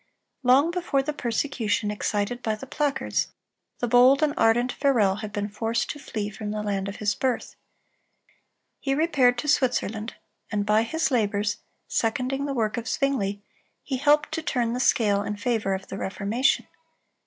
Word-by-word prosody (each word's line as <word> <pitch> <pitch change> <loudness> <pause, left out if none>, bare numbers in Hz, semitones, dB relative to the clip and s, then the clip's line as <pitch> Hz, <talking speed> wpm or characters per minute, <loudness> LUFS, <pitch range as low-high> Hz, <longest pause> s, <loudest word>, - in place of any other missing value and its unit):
Long 270 +5 +4
before 345 -6 0
the 300 +2 -3
persecution 230 -5 -1
excited 210 +3 -2
by 220 -2 -1
the 215 - -9
placards, 285 +1 -1 0.5
the 245 - -1
bold 250 +5 +6
and 295 -1 +2
ardent 240 -2 +3
Farel 220 -9 +2
had 215 -1 -6
been 205 -1 -2
forced 225 +2 -2
to 295 - -9
flee 210 -6 -4
from 210 +1 -6
the 210 0 -3
land 200 -2 -2
of 200 - -7
his 205 -1 0
birth. 260 -2 -2 1.2
He 270 -1 0
repaired 280 -6 +3
to 270 - -3
Switzerland, 235 -6 0 0.4
and 205 -1 0
by 215 +1 +4
his 270 +5 -1
labors, 210 -3 +1 0.3
seconding 255 +4 -1
the 275 - -2
work 220 -1 0
of 235 -1 -4
Zwingle, 205 -9 -1 0.4
he 265 - -2
helped 295 +3 +3
to 325 0 -2
turn 240 -6 0
the 250 - -2
scale 205 -5 +3
in 210 0 -3
favor 220 -3 0
of 190 0 -8
the 195 - -5
Reformation. 210 +7 0
235 Hz, 165 wpm, -25 LUFS, 210-270 Hz, 1.2 s, bold